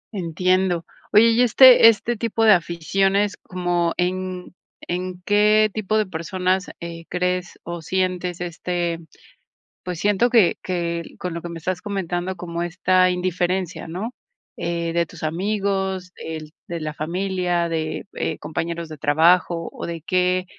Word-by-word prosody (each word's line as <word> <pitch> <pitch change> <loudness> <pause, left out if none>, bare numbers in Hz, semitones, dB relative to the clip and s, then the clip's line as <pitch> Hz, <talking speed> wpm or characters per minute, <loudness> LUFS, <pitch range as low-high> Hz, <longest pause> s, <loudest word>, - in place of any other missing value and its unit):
Entiendo, 180 0 +1 0.3
oye, 220 +2 +7
y 230 - +3
este 250 0 +8
este 230 +2 0
tipo 225 0 0
de 215 - +8
aficiones 195 +4 +1
como 175 -3 -1
en 185 0 -2 0.3
en 180 0 -4
qué 210 +1 +4
tipo 215 0 -1
de 215 - +2
personas, 185 +2 -1
eh, 165 -1 -7
crees 180 0 -1
o 170 -1 -6
sientes, 180 0 -1
este, 175 -1 -2 0.8
pues, 180 -3 -5
siento 205 +4 +2
que 225 -7 +4
que, 170 -2 -2 0.2
con 180 -2 -4
lo 170 - -5
que 175 - -6
me 170 - -6
estás 180 +3 -3
comentando, 185 -2 -3
como 170 -1 -4
esta 185 +1 +2
indiferencia, 180 0 -1
¿no?, 195 +8 -4 0.4
eh, 170 -1 -2
de 170 0 +2
tus - - -13
amigos, 190 +1 -1
el 155 -1 -7 0.2
de 170 -1 -3
la 155 -1 -4
familia, 175 +1 -1
de, 160 +1 -3
eh, 160 - -2
compañeros 170 +1 -4
de 155 -1 -9
trabajo, 165 +3 +3
o, - - -6
¿de 165 -2 -6
qué 180 0 +2
180 Hz, 145 wpm, -22 LUFS, 170-190 Hz, 0.8 s, este